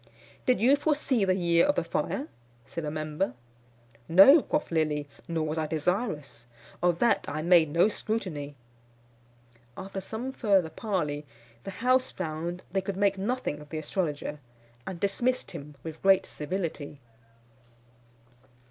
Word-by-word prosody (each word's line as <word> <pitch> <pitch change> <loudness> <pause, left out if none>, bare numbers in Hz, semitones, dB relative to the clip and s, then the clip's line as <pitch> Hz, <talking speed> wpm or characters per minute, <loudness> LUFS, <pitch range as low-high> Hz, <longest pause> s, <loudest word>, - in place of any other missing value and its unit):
"Did 250 -4 +4
you 255 +6 +5
foresee 285 -7 +1
the 185 -1 +2
year 170 +2 +3
of 290 - +2
the - - +1
fire?" 280 - -2 0.4
said 165 - -5
a - - -1
member. 155 -1 -2 0.7
"No," 195 - +9
quoth 295 -6 -2
Lilly, 150 -3 0 0.2
"nor 165 -2 -1
was 155 +1 -2
I 155 - -1
desirous. 155 - -2 0.3
Of 175 -1 +2
that 235 - +2
I 155 +1 -3
made 170 -2 +5
no 170 +6 +4
scrutiny." 180 -10 -3 1.2
After 195 0 -5
some 225 +7 -5
further 195 -10 +2
parley, 150 -7 -2 0.4
the - - -4 0.2
house 255 0 +4
found 170 +1 -4
they 195 +1 +1
could 190 0 -4
make 200 -1 +2
nothing 225 -7 -2
of 150 0 -13
the 160 - -4
astrologer, 150 -2 -3 0.5
and 185 -3 -5
dismissed 245 +7 0
him 145 +1 -9
with 160 -1 -7
great 195 -1 +5
civility. 155 -3 -4
175 Hz, 140 wpm, -28 LUFS, 155-205 Hz, 1.2 s, No